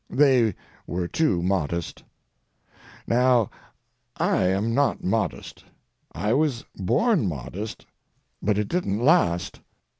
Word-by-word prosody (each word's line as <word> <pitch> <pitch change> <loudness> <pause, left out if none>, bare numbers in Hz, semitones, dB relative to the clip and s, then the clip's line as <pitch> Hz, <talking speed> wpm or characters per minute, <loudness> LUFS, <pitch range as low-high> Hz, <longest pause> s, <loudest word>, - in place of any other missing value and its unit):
They 130 -8 +3 0.3
were 90 0 -2
too 95 - +1
modest. 85 -3 -2 1.0
Now, 125 -2 +3 0.7
I 95 - +1
am 100 +5 0
not 140 0 +1
modest. 95 -2 -2 0.5
I 105 +7 -1
was 140 -4 0
born 180 - +1
modest, 90 - -6 0.6
but 105 -1 +1
it 105 -1 0
didn't 170 - -1
last. 120 - +2
105 Hz, 100 wpm, -24 LUFS, 90-130 Hz, 1.0 s, They